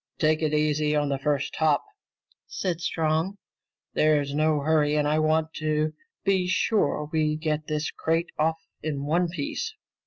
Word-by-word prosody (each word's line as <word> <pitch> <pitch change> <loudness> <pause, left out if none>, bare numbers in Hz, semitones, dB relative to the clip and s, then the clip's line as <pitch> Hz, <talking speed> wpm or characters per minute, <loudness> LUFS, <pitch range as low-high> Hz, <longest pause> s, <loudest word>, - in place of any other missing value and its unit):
"Take 155 0 +2
it 155 -2 +1
easy 150 0 +1
on 145 -1 +1
the 135 -1 -1
first 140 -1 -1
hop," 155 -2 +2 0.6
said 180 -3 -3
Strong. 165 +4 0 0.6
"There's 150 -2 +2
no 155 0 +2
hurry 150 0 +2
and 150 -1 +2
I 155 +1 +2
want 155 +1 +1
to 155 0 0 0.3
be 190 -2 +2
sure 180 -6 +1
we 155 -1 +2
get 155 -1 -2
this 150 0 -1
crate 165 +1 -1
off 160 +1 +2 0.2
in 145 -3 -3
one 170 +4 +2
piece." 185 - -4
155 Hz, 155 wpm, -26 LUFS, 150-160 Hz, 0.6 s, Take